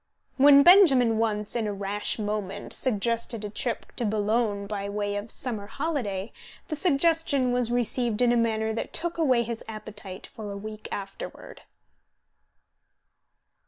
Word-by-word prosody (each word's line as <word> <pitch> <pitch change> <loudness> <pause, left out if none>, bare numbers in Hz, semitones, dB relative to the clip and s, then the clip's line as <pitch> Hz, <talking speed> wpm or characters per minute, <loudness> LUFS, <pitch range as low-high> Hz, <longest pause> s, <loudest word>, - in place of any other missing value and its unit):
When 280 +1 +8
Benjamin 270 - +6
once, 210 -2 -1
in 225 -3 0
a 205 - -2
rash 200 +1 -1
moment, 210 -3 -3
suggested 230 -1 -1
a 205 - -6
trip 240 +2 -3
to - - 0
Boulogne 210 -1 0
by 200 -1 -4
way 205 0 -2
of 205 +2 -5
summer 215 -5 -5
holiday, 225 -7 -3 0.4
the 310 - -2
suggestion 310 -4 +2
was 245 -1 +1
received 240 -2 0
in 245 -1 +4
a - - +3
manner 220 -1 0
that 225 - -5
took 340 0 -1
away 255 -7 +3
his 230 0 -5
appetite 210 -3 -8
for 215 -3 -7
a 200 - -6
week 215 +1 -8
afterward. 195 -1 -7
225 Hz, 145 wpm, -26 LUFS, 205-250 Hz, 0.4 s, When